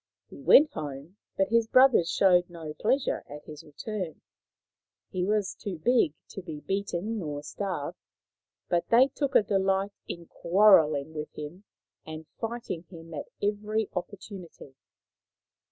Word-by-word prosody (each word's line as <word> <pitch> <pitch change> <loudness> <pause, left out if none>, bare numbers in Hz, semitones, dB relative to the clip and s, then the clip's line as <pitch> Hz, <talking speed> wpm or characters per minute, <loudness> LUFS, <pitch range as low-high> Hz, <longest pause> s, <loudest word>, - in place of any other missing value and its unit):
He - - -11
went 300 +2 +7
home, 150 +5 -7 0.2
but 195 0 +2
his 230 0 +3
brothers 255 -9 +5
showed 180 -2 +4
no 165 -3 -7
pleas 255 - +1
ure - - -2
at 150 +1 -9
his 150 -1 -10
return. 180 +3 -6 0.9
He 180 - -1
was 205 -2 0
too 200 -5 -6
big 165 - +2
to 195 - -7
be 160 -4 -7
beaten 200 +3 -2
or 145 -3 -5
starved, 175 0 -4 0.7
but 170 -1 0
they 250 +4 +6
took 280 0 -3
a - - +7
delight 195 0 +1 0.2
in 170 0 -6
quarrelling 160 -6 +4
with 150 -1 -6
him 160 +7 -8 0.4
and 160 0 -8
fighting 225 -7 -4
him 165 -2 -11
at 145 - -5 0.2
every 210 +1 -1
opportunity. 180 -6 -8
185 Hz, 140 wpm, -28 LUFS, 160-210 Hz, 0.9 s, went